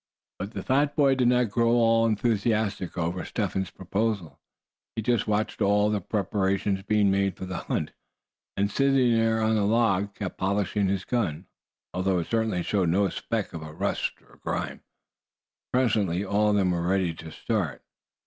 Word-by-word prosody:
But 100 +4 -5
the - - -4
fat 145 +2 +1
boy 140 -2 +4
did 130 -2 +2
not 125 -3 +3
grow 115 +1 +2
at - - +3
all 115 -1 +4
enthusiastic 110 -4 0
over 90 +1 -2
Step - - -2
Hen's 95 -1 -2
proposal. 95 -1 -2 0.6
He 110 - -2
just 120 -1 +1
watched 105 +1 -1
all 105 +1 +3
the 105 -1 0
preparations 95 0 0
being 105 0 +2
made 100 -2 +1
for - - -5
the 95 -1 -5
hunt; 75 - -2 0.7
and 100 +1 +1
sitting 135 -3 +3
there 115 0 +2
on 110 0 +2
the 105 -2 +2
log, 100 -2 +2
kept 100 -4 -5
polishing 100 +1 0
his 95 -1 -1
gun, 95 -9 -1 0.5
although 95 +1 +1
it 85 - -1
certainly 110 -6 0
showed 95 -3 +1
no 95 +3 +2
speck 110 -4 -3
of 80 - -6
rust 80 0 -2
or - - -20
grime. - - -3 0.9
Presently 105 -7 +1
all 105 +2 +2
of 105 - +2
them 95 -3 +2
were 85 -1 -1
ready 90 -1 +1
to 80 0 -10
start. - - -2
100 Hz, 175 wpm, -26 LUFS, 95-115 Hz, 0.9 s, boy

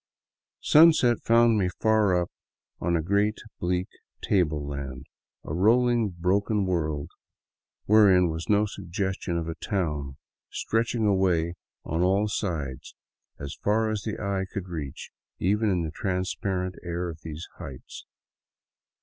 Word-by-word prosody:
Sunset 150 -6 +6
found 115 -1 +4
me 90 -2 +1
far 110 -4 +3
up 85 - -3 0.5
on 85 0 0
a 80 - -2
great 100 +4 +1 0.2
bleak 90 +1 -1 0.4
table 75 -7 +1
land, 70 -2 -6 0.4
a - - -5
rolling, 115 +4 +3
broken 100 +4 0
world, 80 -5 -2 0.7
wherein 100 -4 +6
was 80 +1 -6
no 105 0 +4
suggestion 95 -2 -3
of 85 -1 -3
a 80 - -3
town, 75 -7 -3 0.3
stretching 115 0 -1
away 90 -4 +2 0.3
on 80 +3 -1
all 95 +3 +2
sides 75 -11 -4 0.4
as 70 +2 -6
far 110 +1 0
as 105 -2 -2
the 110 0 -4
eye 100 -2 -1
could 95 -2 -5
reach 75 -6 -6 0.3
even 105 +4 +1
in 90 -3 +1
the 80 - -4
transparent 90 +1 -2
air 85 0 -3
of 80 -1 -8
these 80 +1 -7
heights. 70 -8 -9
90 Hz, 130 wpm, -26 LUFS, 80-105 Hz, 0.7 s, Sunset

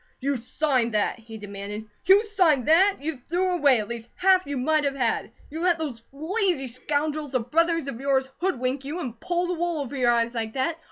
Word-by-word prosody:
"You 280 +2 0
signed 245 -1 0
that?" 210 +3 0
he 225 0 -10
demanded. 205 +1 -7 0.2
"You 390 +3 +7
signed 360 - +2
that! 380 +6 +5
YOU 295 -3 -4
THREW 365 +2 +1
AWAY 280 -7 +4
AT 210 - -7
LEAST 235 0 -7
HALF 375 -3 +3
YOU 285 -1 -3
MIGHT 300 +3 +1
HAVE 275 -1 0
HAD! 240 -4 -1 0.2
You 315 - -5
let 350 0 +2
those 285 -8 -5
lazy 335 +1 -1
scoundrels 290 +3 -2
of 245 -1 -1
brothers 330 -1 +2
of 265 -3 -6
yours 270 -1 +1
hoodwink 265 -7 -1
you, 300 +6 -4
and 245 -8 -6
pull 350 0 -1
the 360 - -1
wool 345 -1 -1
over 280 -1 -5
your 250 -3 +2
eyes 235 0 +2
like 225 -2 -3
that? 315 +5 -1
280 Hz, 210 wpm, -25 LUFS, 245-330 Hz, 0.2 s, You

